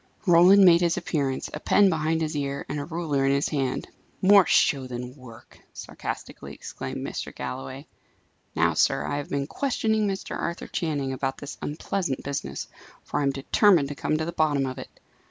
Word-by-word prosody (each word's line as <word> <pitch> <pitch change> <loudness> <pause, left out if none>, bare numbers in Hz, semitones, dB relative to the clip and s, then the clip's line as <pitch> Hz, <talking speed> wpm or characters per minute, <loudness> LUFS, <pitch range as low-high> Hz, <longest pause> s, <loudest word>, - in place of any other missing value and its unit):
Roland 185 +2 +7
made 170 -1 +7
his 170 0 +1
appearance, 145 -7 -2
a 150 - -4
pen 200 +5 +4
behind 160 -2 0
his 155 0 -3
ear, 140 -1 -3
and 150 - -3
a 145 - -4
ruler 160 -5 -1
in 135 - +3
his 140 +1 +1
hand. 135 -4 -2 0.3
"More 195 -1 +6
show 135 -3 +3
than 125 +1 -6
work!" 120 -4 -15
sarcastically - - -7
exclaimed - - -6
Mr. - - -5
Galloway. 130 +2 -6 0.7
"Now, - - +3
sir, - - +2
I 145 - -2
have 145 - -5
been 140 -1 -1
questioning 220 - 0
Mr. 195 0 -4
Arthur 170 +1 -4
Channing 145 -5 -2
about 135 +1 -2
this 145 - -8
unpleasant 155 -1 -3
business, 140 - -4 0.4
for - - -3
I - - 0
am 140 - +2
determined 140 +3 +3
to - - -4
come 155 - -1
to 160 - -2
the 170 - -3
bottom 150 -4 +1
of 130 -1 -5
it. - - -8
145 Hz, 185 wpm, -25 LUFS, 135-170 Hz, 0.7 s, Roland